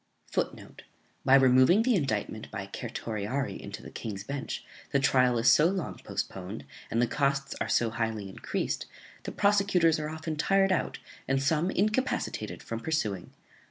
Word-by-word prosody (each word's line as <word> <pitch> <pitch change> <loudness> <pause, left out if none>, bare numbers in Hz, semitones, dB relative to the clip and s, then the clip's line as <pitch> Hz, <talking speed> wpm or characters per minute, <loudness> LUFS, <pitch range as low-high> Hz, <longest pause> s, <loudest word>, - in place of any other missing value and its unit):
[Footnote: - - -3 0.4
By 135 - +6
removing 130 - +6
the 250 +1 +3
indictment 110 - -1
by 100 -2 -5
certiorari 115 +2 -3
into - - -8
the - - -10
King's 100 -3 -5
Bench, 140 +4 -5 0.3
the 140 - +3
trial 125 -2 +3
is 115 +2 +5
so 150 - +6
long 185 -2 -3
postponed, 95 +3 -5 0.2
and 115 - 0
the 120 - +4
costs 140 +2 0
are - - -1
so 115 -2 +2
highly 110 -3 -2
encreased, 95 - -3 0.3
that - - -7
prosecutors 195 -6 +3
are 150 0 -3
often 160 0 -4
tired 195 +4 +3
out, 185 - 0 0.3
and 135 0 +2
some 155 +5 +1
incapacitated 210 - -1
from 115 - -4
pursuing. 110 - -2
135 Hz, 155 wpm, -29 LUFS, 115-165 Hz, 0.4 s, By